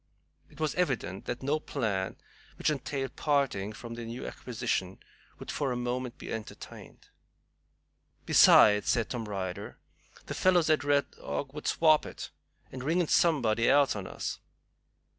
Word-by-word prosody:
It - - -18
was 155 -2 0
evident 130 - -2
that 120 +2 -4
no 145 +3 +1
plan 105 -11 -2 0.4
which - - +1
entailed 135 -1 -4
parting 135 -9 0
from 115 +2 -9
their 115 0 -6
new 120 +3 -6
acquisition 95 -6 -3 0.4
would - - -7
for 140 -3 -1
a - - -1
moment 125 0 -3
be - - -7
entertained. 110 -1 -9 1.2
"Besides," 105 -1 +6
said 115 -2 +1
Tom 120 -3 -3
Ryder, 95 -3 -5 0.5
"them - - -5
fellows 175 -4 +3
at 155 - +2
Red 145 0 +1
Dog 135 -1 -5
would 150 - -6
swap 155 -2 +4
it, - - -8 0.4
and 130 -1 -7
ring 165 +6 +1
in 175 - 0
somebody 120 -9 +3
else 140 -4 +4
on 100 -3 -5
us." - - -5
130 Hz, 150 wpm, -29 LUFS, 110-145 Hz, 1.2 s, Besides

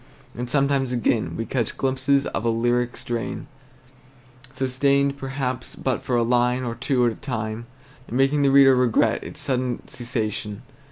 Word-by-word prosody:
And 125 +1 -4
sometimes 140 -1 +1
again 120 -2 0
we 115 - -2
catch 120 -3 -2
glimpses 135 +1 +1
of 95 - -3
a 115 - +2
lyric 120 +1 0
strain, 120 +3 -4 1.1
sustained 140 +1 +1
perhaps 135 -2 -4
but 130 -3 -1
for 125 - -1
a 120 - +3
line 125 +1 +2
or 120 -2 -2
two 125 +1 +1
at 120 - +3
a - - -7
time, 110 -3 -4 0.4
and 120 - -3
making 135 +2 +3
the 140 - +4
reader 135 -1 +7
regret 120 -3 +2
its - - -9
sudden 130 -4 -2
cessation. 110 -2 -4
125 Hz, 160 wpm, -23 LUFS, 120-135 Hz, 1.1 s, reader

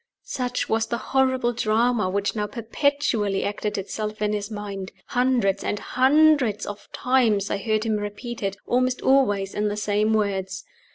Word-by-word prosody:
Such 250 -1 -2
was 225 0 +1
the 235 - -2 0.2
horrible 260 -2 +2
drama 225 -2 +1
which 200 +3 -1
now 210 -1 -1
perpetually 230 -3 0
acted 205 +1 -2
itself 210 +2 -4
in 210 0 0
his 205 0 -3
mind. 200 -3 -6 0.2
Hundreds 245 -6 +1
and 210 - -1
hundreds 265 -3 +3
of 205 0 -8
times 230 -6 +2
I - - +1
heard 215 +1 0
him 220 -2 0
repeat 210 +3 -6
it, 195 -1 -2
almost 255 +1 0
always 205 -8 +2
in 210 0 0
the 205 0 -2
same 210 +1 +1
words. 195 -2 -2
215 Hz, 160 wpm, -24 LUFS, 205-245 Hz, 0.2 s, hundreds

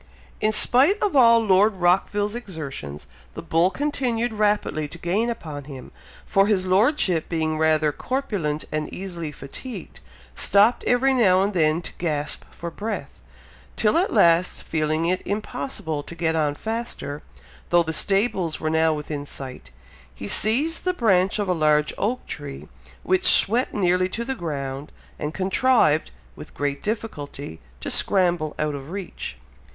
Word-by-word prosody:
In 215 0 +2
spite 265 - +4
of 405 -7 0
all 230 -3 +7
Lord 200 +1 +4
Rockville's 195 +3 +1
exertions, 150 - -6 0.3
the - - -7
bull 165 +3 +3
continued 245 -3 -1
rapidly 210 -7 0
to 155 - -9
gain 195 +8 0
upon 150 - -6
him, 135 -3 -10 0.3
for 195 +1 +3
his 195 -3 +2
Lordship, 185 - +2
being 155 -2 -1
rather 155 -1 +3
corpulent 195 - -3
and 155 0 -3
easily 175 -5 -5
fatigued, 150 - -9 0.3
stopped 205 +4 +3
every 260 +2 +3
now 190 -7 +4
and 205 +1 -1
then 160 -1 +2
to - - -6
gasp 150 -4 -2
for 170 0 -7
breath; 215 +5 -6 0.5
till 210 -1 +2
at 355 +4 +2
last, 170 +2 +3
feeling 155 0 -1
it 180 +2 0
impossible 200 - -4
to 170 - -10
get 160 -1 0
on 150 -2 +1
faster, 220 -9 -4 0.5
though 175 0 +4
the 160 0 -3
stables 195 -3 0
were 155 0 -1
now 160 0 +3
within 150 -1 -5
sight, 130 - -8 0.5
he 100 - -6
seized 270 - +2
the 365 0 0
branch 190 - +2
of 205 -2 -1
a 180 - +2
large 150 -2 +2
oak 240 +5 -1
tree, 145 -2 -7 0.4
which 375 0 +2
swept 235 +5 +4
nearly 185 -2 +1
to 235 +5 -4
the 265 - -2
ground, 140 - -5 0.3
and 150 +1 -4
contrived, 190 - +2 0.3
with - - -11
great 145 -1 -2
difficulty, 145 - -5 0.2
to - - -3
scramble 175 -5 +2
out 150 -1 -1
of 140 0 -7
reach. 180 - -6
180 Hz, 150 wpm, -23 LUFS, 155-220 Hz, 0.5 s, all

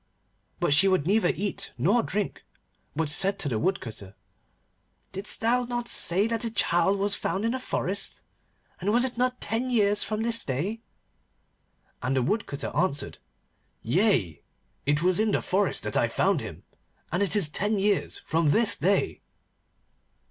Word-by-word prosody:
But - - +2
she 185 +7 +5
would 185 -6 +2
neither 200 +1 +3
eat 200 0 -4
nor 195 - +3
drink, 205 -2 -3 0.5
but 160 +1 0
said 195 +7 +2
to 195 - -3
the 115 -5 -1
Woodcutter, 110 - -3 1.0
'Didst 195 +2 -3
thou 240 +2 +2
not 240 0 -3
say 190 0 +3
that 230 -1 -1
the 230 - -1
child 195 -3 +2
was 200 +1 0
found 200 +1 -2
in 230 - +1
the 260 - -2
forest? 200 -5 -2 0.6
And 195 +3 0
was 240 +3 +4
it 255 - -3
not 250 +1 0
ten 230 +4 -2
years 210 -4 +3
from 215 +1 -2
this 230 0 +3
day?' 175 - -3 1.2
And 130 +2 -1
the 130 - +2
Woodcutter 195 - -2
answered, 150 -2 -1 0.6
'Yea, 120 - +1 0.5
it 145 +2 +2
was 180 +1 +3
in 215 -1 +1
the - - +2
forest 195 +1 0
that - - -4
I - - +3
found - - +1
him, - - -9 0.5
and 175 +4 0
it 200 -2 +2
is 200 -7 +4
ten 205 +8 0
years 200 0 0
from 165 -1 0
this 220 +7 +2
day. 200 - 0
200 Hz, 160 wpm, -26 LUFS, 165-220 Hz, 1.2 s, she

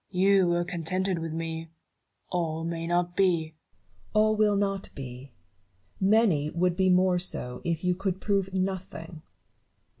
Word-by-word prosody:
Newton. 180 - -4
You 195 -2 +5
were 175 0 +2
contented 180 +1 -1
with 165 -1 -4
me; 165 0 -4 0.6
all 165 -2 -1
may 165 0 -3
not 175 0 0
be. 170 -5 +2 0.6
Barrow. 215 - +6
All 215 0 +2
will 210 -1 +3
not 195 -1 -1
be: 130 0 -8 0.7
many 190 -7 +3
would 175 +2 +1
be 190 0 +3
more 180 0 +4
so 125 -8 -4
if 170 -1 -2
you 180 0 +2
could 190 0 -2
prove 195 -2 0
nothing. 185 -4 -4
180 Hz, 150 wpm, -28 LUFS, 165-190 Hz, 0.7 s, Barrow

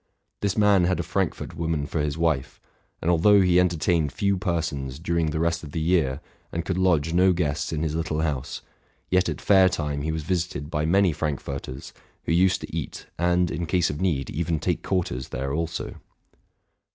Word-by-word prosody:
This 100 0 -1
man 100 -4 +5
had 90 +1 +1
a - - 0
Frankfort - - -2
woman 80 -3 -1
for 80 - -3
his 75 0 -2
wife; 80 -5 0 0.4
and 85 - +3
although 100 +5 +5
he 90 -1 +4
entertained 85 -3 +1
few 100 +3 +1
persons 80 -8 -2
during 85 0 0
the 75 +1 -2
rest 85 0 0
of 70 - -9
the 80 - -1
year, 80 -5 +1 0.3
and 85 0 -3
could 95 +1 -1
lodge 85 -4 +2
no 90 +1 +5
guests 75 -4 -1
in 80 -1 -2
his 80 -2 -1
little 80 -1 -1
house, 75 -5 -3 0.5
yet 90 +1 +3
at - - -4
fair 95 -2 +5
time 75 -4 -2
he 80 +2 -1
was 80 -1 -3
visited 85 -3 -2
by 75 0 0
many 95 0 +4
Frankforters, 70 -3 -4 0.3
who - - -2
used 90 +2 +3
to - - -7
eat, - - -5
and, 90 0 +2
in 85 - -3
case 90 -2 +2
of 75 - -6
need, 75 -9 0
even 80 0 -1
take - - -1
quarters, 85 -9 -2
there 70 +2 -3
also. 85 +2 -3
85 Hz, 190 wpm, -25 LUFS, 75-90 Hz, 0.5 s, man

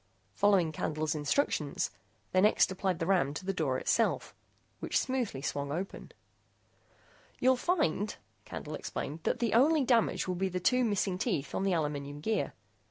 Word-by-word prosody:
Following 195 - +3
Candle's 155 0 -2
instructions, 150 - 0 0.4
they 185 - +3
next 210 -1 +4
applied 190 -1 -1
the 165 - -2
ram 165 -7 +2
to 185 - -6
the 195 - 0
door 145 -8 0
itself, - - +1 0.5
which - - 0
smoothly 245 - -1
swung 140 -1 -2
open. 180 +6 -5 1.3
"You'll 260 +1 +4
find," 215 - 0 0.3
Candle - - -7
explained, 150 +4 -5
"that - - +1
the 230 -3 0
only 290 +6 +5
damage 235 -6 +2
will 185 - 0
be 190 +2 -1
the 180 0 -2
two 250 +7 +3
missing 200 -4 0
teeth 160 - -1
on - - -1
the 195 -1 +1
aluminum 145 -3 -2
gear. 220 +8 -1
185 Hz, 160 wpm, -31 LUFS, 150-220 Hz, 1.3 s, only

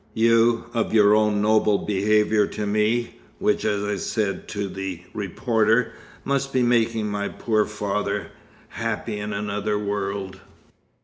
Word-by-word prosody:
"You, 115 +1 +3
of 115 -1 -1
your 105 -1 +6
own 105 -1 +2
noble 105 -1 +3
behaviour 105 +1 +2
to 105 - -4
me, 110 - 0 0.2
which, - - +1
as 100 -1 0
I 105 0 -1
said 105 0 -2
to 100 -1 -3
the 95 -2 -6
reporter, 110 +3 +1 0.3
must 140 0 -1
be 130 -2 +2
making 115 -2 +2
my 100 0 -2
poor 110 -2 0
father 105 -1 -3 0.4
happy 105 - -3
in 105 +1 -4
another 105 0 -2
world. 100 -2 -3
105 Hz, 135 wpm, -23 LUFS, 100-110 Hz, 0.4 s, your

